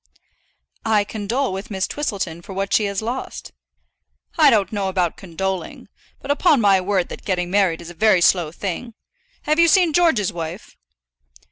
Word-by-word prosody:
"I 220 Hz, -3 st, +2 dB
condole 220 Hz, +3 st, -2 dB
with 195 Hz, +2 st, -6 dB
Miss 190 Hz, -2 st, -1 dB
Twistleton 195 Hz, -, -4 dB
for 195 Hz, +2 st, -10 dB
what 195 Hz, +1 st, -3 dB
she 215 Hz, -, +3 dB
has 200 Hz, +1 st, -3 dB
lost." 245 Hz, +4 st, -5 dB, 0.8 s
"I 310 Hz, -3 st, +6 dB
don't 215 Hz, -6 st, +2 dB
know 200 Hz, -3 st, -2 dB
about 180 Hz, -3 st, 0 dB
condoling. 190 Hz, +1 st, -5 dB, 0.3 s
But 280 Hz, -, -2 dB
upon 300 Hz, -1 st, +3 dB
my 200 Hz, -3 st, +4 dB
word 185 Hz, -1 st, 0 dB
that -, -, -9 dB
getting 180 Hz, -2 st, -2 dB
married 185 Hz, -4 st, +2 dB
is 170 Hz, 0 st, -9 dB
a -, -, -11 dB
very 205 Hz, 0 st, +3 dB
slow 175 Hz, -3 st, +3 dB
thing. 205 Hz, +7 st, -5 dB, 0.5 s
Have 305 Hz, +1 st, +1 dB
you 335 Hz, -, +6 dB
seen 345 Hz, -2 st, +4 dB
George's 305 Hz, -, +2 dB
wife?" 165 Hz, -, -7 dB
200 Hz, 165 wpm, -21 LUFS, 185-235 Hz, 0.8 s, I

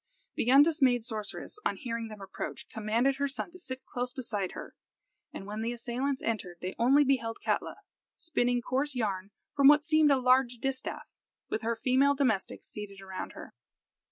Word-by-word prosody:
The 235 Hz, -, -1 dB
undismayed 270 Hz, -3 st, +5 dB
sorceress, 220 Hz, -, -5 dB
on 455 Hz, -, 0 dB
hearing 230 Hz, -5 st, -4 dB
them 215 Hz, -2 st, -10 dB
approach, 195 Hz, -, -6 dB
commanded 230 Hz, +5 st, +1 dB
her 280 Hz, 0 st, +1 dB
son 275 Hz, +5 st, -4 dB
to 365 Hz, -, -13 dB
sit 265 Hz, -7 st, -5 dB
close 245 Hz, 0 st, -3 dB
beside 210 Hz, -7 st, -3 dB
her, -, -, -8 dB, 0.6 s
and 195 Hz, -, -8 dB
when 210 Hz, +2 st, -5 dB
the 230 Hz, +2 st, -1 dB
assailants 255 Hz, +3 st, -2 dB
entered 195 Hz, -6 st, -2 dB
they 185 Hz, +1 st, -4 dB
only 270 Hz, +5 st, +5 dB
beheld 240 Hz, -5 st, 0 dB
Katla, -, -, 0 dB, 0.4 s
spinning 245 Hz, -7 st, 0 dB
coarse 270 Hz, +3 st, -1 dB
yarn 200 Hz, -5 st, -2 dB, 0.3 s
from 280 Hz, -1 st, +6 dB
what 295 Hz, +1 st, +7 dB
seemed 310 Hz, -2 st, +5 dB
a 280 Hz, -, +5 dB
large 255 Hz, -1 st, +3 dB
distaff, 260 Hz, +2 st, -4 dB, 0.4 s
with 220 Hz, -, -1 dB
her 230 Hz, 0 st, 0 dB
female 260 Hz, +5 st, +3 dB
domestics 235 Hz, -9 st, 0 dB
seated 205 Hz, -2 st, -8 dB
around 190 Hz, -1 st, -6 dB
her. -, -, -10 dB
245 Hz, 170 wpm, -30 LUFS, 220-275 Hz, 0.6 s, what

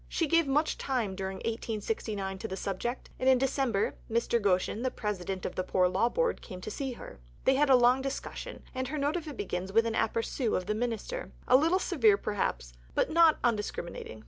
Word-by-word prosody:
She 330 Hz, -, 0 dB
gave 330 Hz, 0 st, +3 dB
much 295 Hz, +3 st, +1 dB
time 240 Hz, -8 st, -1 dB
during 190 Hz, 0 st, -4 dB
1869 215 Hz, -3 st, -3 dB
to -, -, -4 dB
the 190 Hz, -, -5 dB
subject, 220 Hz, +7 st, -4 dB
and 260 Hz, -, +3 dB
in 260 Hz, -, +6 dB
December 260 Hz, -5 st, +1 dB, 0.2 s
Mr. 235 Hz, +1 st, +1 dB
Goschen, 195 Hz, +2 st, +1 dB
the 255 Hz, -, +1 dB
President 195 Hz, -5 st, -4 dB
of -, -, -3 dB
the 185 Hz, -, -1 dB
Poor 180 Hz, 0 st, +2 dB
Law 190 Hz, +6 st, +2 dB
Board, -, -, 0 dB
came 185 Hz, -4 st, -8 dB
to 215 Hz, -, -6 dB
see 265 Hz, +3 st, -3 dB
her. 235 Hz, -, -11 dB, 0.3 s
They 265 Hz, -, +5 dB
had 285 Hz, +2 st, +3 dB
a 265 Hz, -, +8 dB
long 250 Hz, +1 st, +5 dB
discussion, 275 Hz, -, -5 dB
and 260 Hz, 0 st, -2 dB
her 305 Hz, +4 st, -3 dB
note 290 Hz, +3 st, 0 dB
of 335 Hz, -3 st, -3 dB
it 290 Hz, -5 st, -7 dB
begins 190 Hz, -1 st, -3 dB
with 225 Hz, +3 st, +4 dB
an 230 Hz, -, -1 dB
aperçu 225 Hz, +2 st, 0 dB
of 185 Hz, -, -4 dB
the 210 Hz, -, 0 dB
Minister 240 Hz, -, -3 dB, 0.2 s
a 250 Hz, -, +6 dB
little 325 Hz, +7 st, +4 dB
severe, 235 Hz, -, +3 dB
perhaps, 185 Hz, -, -2 dB, 0.2 s
but -, -, +1 dB
not 330 Hz, -1 st, +6 dB
undiscriminating. 210 Hz, -, -2 dB
230 Hz, 205 wpm, -30 LUFS, 195-270 Hz, 0.3 s, a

